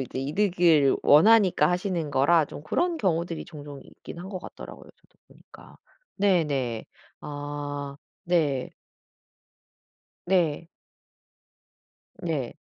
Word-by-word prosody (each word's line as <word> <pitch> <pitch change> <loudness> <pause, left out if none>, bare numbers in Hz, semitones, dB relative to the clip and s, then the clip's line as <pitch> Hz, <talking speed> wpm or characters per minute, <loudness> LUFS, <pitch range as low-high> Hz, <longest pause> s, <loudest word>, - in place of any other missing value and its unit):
이제 130 0 -5
이득을 165 -2 +3
원하니까 185 -1 +5
하시는 180 -4 -2
거라 155 +5 +4
좀 145 - -10
그런 345 - 0
경우들이 170 - -1
종종 145 -4 -10
있긴 - - -12
한 185 - -8
것 190 -2 -5
같더라고요 - - -11
저도 - - -34
보니까. - - -17 0.4
네네. 150 - 0 0.4
아 145 -1 -6 0.3
네. 150 -7 0 1.6
네. 170 -3 +1 1.5
네. 150 -8 -3
155 Hz, 205 characters per minute, -26 LUFS, 145-180 Hz, 1.6 s, 원하니까